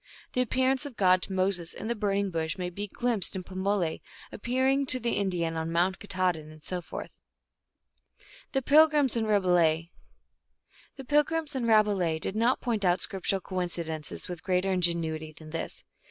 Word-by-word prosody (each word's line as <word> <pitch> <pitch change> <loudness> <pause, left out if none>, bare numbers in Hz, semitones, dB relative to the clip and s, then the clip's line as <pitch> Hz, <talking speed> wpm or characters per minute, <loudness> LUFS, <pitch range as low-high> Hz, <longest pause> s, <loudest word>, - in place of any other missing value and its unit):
The 250 - +2
ap 250 - -1
pearance 260 +2 +1
of 250 -6 -12
God 185 -1 +4
to 195 - -4
Moses 185 -3 0
in 220 - -5
the 235 - +1
Burning 200 -2 0
Bush 160 +1 -2
may 180 -1 -3
be 205 +4 -4
glimpsed 230 -3 -1
in 185 - -4
Pamole 190 -2 -1 0.3
appearing 260 +4 +1
to 255 - +3
the 235 -1 -1
Indian 175 -5 0
on 160 0 -2
Mount 180 +3 +1
Katahdin, 180 -6 -1
and 155 -1 -14
so 180 +3 -3
forth." - - -7 1.4
The 270 -1 +1
pilgrims 300 -2 +5
in 225 -1 +1
Rabelais 175 -5 +2 1.1
did 235 - +1
not 235 +4 +2
point 225 -5 -1
out 180 -1 +4
scriptu 195 +2 -1
ral 195 - -1
coincidences 170 -4 -4
with 180 -2 -6
greater 185 0 +1
ingenuity 165 -3 0
than 155 0 -13
this. 165 - -5
190 Hz, 155 wpm, -28 LUFS, 170-235 Hz, 1.4 s, pilgrims